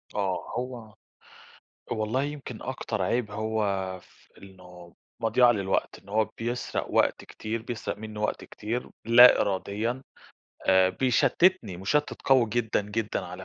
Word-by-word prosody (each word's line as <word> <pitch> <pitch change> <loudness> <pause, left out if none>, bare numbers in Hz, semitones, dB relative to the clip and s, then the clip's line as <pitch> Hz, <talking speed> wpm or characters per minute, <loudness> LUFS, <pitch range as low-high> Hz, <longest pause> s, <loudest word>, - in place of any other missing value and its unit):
آه، 95 -3 -1
هو 120 -3 -6 1.0
والله 110 +5 -1
يمكن 140 -5 -6
أكتر 120 -5 -3
عيب 115 +3 0
هو 110 +1 -2 0.4
في - - -24
إنه 90 -3 -14 0.3
مضيَعة 120 +2 +4
للوقت، 95 -3 -1
إن - - -21
هو 110 +2 +2
بيسرق 120 +1 -3
وقت - - +2
كتير، 110 +1 -5
بيسرق 115 -3 -5
منّى 110 0 -8
وقت 105 - -2
كتير 115 +4 -5
لا 120 +2 +8
إراديًا، 105 +5 -1 0.6
آآ، 95 -1 +5
بيشتّتني، 130 - +2
مُشتت 145 +12 -1
قوي 130 -3 +5
جدًا، 110 -1 0
جدًا 105 +1 -3
على 90 +1 -8
110 Hz, 130 wpm, -27 LUFS, 100-120 Hz, 1.0 s, لا